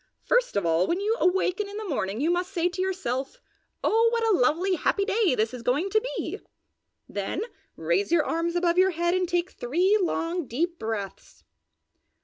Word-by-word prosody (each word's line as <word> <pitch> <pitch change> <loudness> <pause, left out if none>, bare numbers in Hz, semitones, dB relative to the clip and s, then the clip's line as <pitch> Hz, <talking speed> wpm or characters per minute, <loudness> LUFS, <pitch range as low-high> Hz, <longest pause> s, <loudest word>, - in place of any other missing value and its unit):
First - - +1
of 200 -3 0
all, 165 +2 +2
when 350 - 0
you 425 +3 +1
awaken 380 +2 +1
in 405 - -7
the 430 -1 -5
morning 210 - -2
you 320 +4 +2
must 355 +2 -1
say 350 -3 +1
to 365 +1 -4
yourself, 370 - -3 0.4
'Oh 455 +2 +4
what 465 -1 0
a - - +4
lovely, 345 +8 +2
happy 395 +4 +1
day 410 - +2
this 220 +2 0
is 250 - -6
going 290 +11 0
to 435 - +3 0.2
be!' - - -4 0.7
then 205 - -3 0.3
raise 405 -7 0
your 330 -3 +3
arms 335 +1 -1
above 350 0 +2
your 375 +1 +5
head 345 0 0
and 365 -1 0
take 350 0 0
three 360 - +1
long, 340 -2 -1
deep 335 +9 -2
breaths. 215 -3 -6
350 Hz, 185 wpm, -26 LUFS, 275-390 Hz, 0.7 s, your